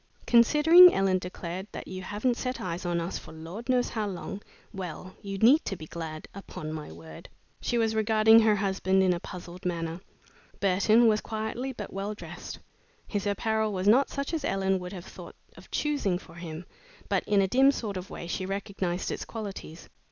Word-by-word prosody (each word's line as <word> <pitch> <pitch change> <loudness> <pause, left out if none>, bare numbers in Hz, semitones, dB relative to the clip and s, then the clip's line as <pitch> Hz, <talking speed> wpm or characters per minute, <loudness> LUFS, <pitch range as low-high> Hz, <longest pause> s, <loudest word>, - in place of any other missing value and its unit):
"Considering," 300 +9 +8
Ellen 190 -1 +2
declared, 180 +1 -6
"that - - -7
you 185 0 -6
haven't 210 +6 -1
set 255 +1 -3
eyes 175 0 -4
on 175 -1 0
us 170 +2 -3
for - - -13
Lord 170 +10 -9
knows 250 -1 +2
how 215 -2 -2
long 195 +1 -6 0.3
well, 185 -1 -7
you 195 -1 -5
need 250 +10 +5
to 195 - -2
be 160 - -9
glad. 155 -1 -7
Upon 155 -5 -7
my 155 - -7
word!" 80 -1 -12 0.3
She 240 - 0
was 225 -1 +2
regarding 220 +1 +5
her 220 -2 +4
husband 190 -1 +1
in 185 -1 +3
a 175 - -3
puzzled 180 -1 -9
manner. 170 -1 -3 0.6
Burton 200 +4 +4
was 215 -1 +3
quietly 220 +4 -4
but 210 -5 -8
well 200 +2 -3
dressed. - - -8 0.5
His 205 -1 -2
apparel 220 +1 0
was 190 0 -2
not 255 +6 +5
such 280 +3 -4
as 315 -3 -1
Ellen 195 -4 +1
would 180 0 -7
have 185 -3 -8
thought - - -11 0.2
of - - -15
choosing 285 -12 0
for 165 - -14
him, 170 0 -7 0.4
but - - +1
in 205 -1 +3
a 195 - +3
dim 265 +7 +5
sort 220 -7 -2
of 185 +1 -6
way - - -7
she 175 +2 -3
recognized 195 -2 -3
its - - -4
qualities. 200 -7 -7
195 Hz, 190 wpm, -28 LUFS, 180-220 Hz, 0.6 s, Considering